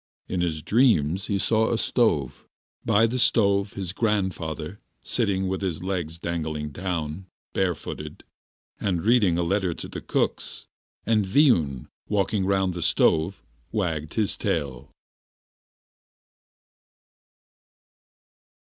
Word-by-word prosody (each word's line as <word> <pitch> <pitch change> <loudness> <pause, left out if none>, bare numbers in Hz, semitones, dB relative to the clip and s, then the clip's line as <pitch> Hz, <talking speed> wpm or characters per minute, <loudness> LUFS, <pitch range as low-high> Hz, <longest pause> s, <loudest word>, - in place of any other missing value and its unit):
In 90 - -2
his 80 -3 -2
dreams 95 - +3
he 100 - 0
saw 110 +3 +2
a 115 - +1
stove, 80 - +1 0.4
by 110 +3 +4
the 125 +3 -1
stove 100 -4 +3
his 95 -3 -4
grandfather 95 -5 -2 0.2
sitting 100 -5 0
with 95 +1 -2
his 90 -3 -2
legs 90 -4 -3
dangling 80 -3 -3
down, 85 +1 -4 0.3
barefooted, 90 -3 -3 0.6
and 90 -5 -1
reading 105 -7 +4
a 85 - +1
letter 95 -1 0
to - - -7
the - - -7
cooks, - - -2 0.4
and 110 -1 +3
Viun 95 - +3 0.2
walking 100 -1 +1
round 95 -2 +1
the 85 - -5
stove 80 +2 +2 0.3
wagging 80 -8 -1
his 105 +3 0
tail. 70 -1 -2
95 Hz, 110 wpm, -25 LUFS, 80-105 Hz, 0.6 s, by